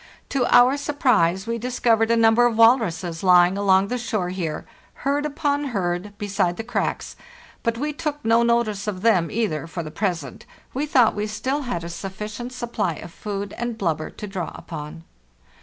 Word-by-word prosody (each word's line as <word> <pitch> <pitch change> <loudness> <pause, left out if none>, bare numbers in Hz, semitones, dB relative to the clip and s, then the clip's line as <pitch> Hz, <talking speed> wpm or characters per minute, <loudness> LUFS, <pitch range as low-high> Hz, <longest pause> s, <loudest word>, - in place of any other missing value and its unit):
To 260 -3 +1
our 250 +3 +6
surprise, 220 - +1
we 230 0 -2
discovered 230 -2 +1
a 230 - +3
number 230 +1 +5
of 230 -2 -2
walruses 190 -8 +3
lying 180 0 +5
along 195 -1 +3
the 250 - -2
shore 215 -6 -2
here, 170 -4 -4 0.4
herd 290 +2 +1
upon 290 -1 -1
herd, 200 -4 -3
beside 200 -4 -1
the 225 - -4
cracks; 240 - -3 0.5
but 230 0 -1
we 295 +4 -2
took 295 -2 -4
no 230 +1 +4
notice 235 -4 +1
of 190 -2 -4
them 185 -8 +3
either, 170 -9 -2
for 170 0 -5
the 155 - -8
present; 170 - -3 0.3
we 285 +4 -2
thought 250 -6 +4
we 210 +1 -2
still 260 +7 -2
had 175 -8 -2
a 170 - -5
sufficient 205 +7 -6
supply 235 -8 -2
of 165 - -10
food 200 -1 -5
and 240 -1 -3
blubber 160 -6 -1
to 210 - -8
draw 190 -4 -4
upon. 155 0 -8
215 Hz, 175 wpm, -23 LUFS, 180-240 Hz, 0.5 s, our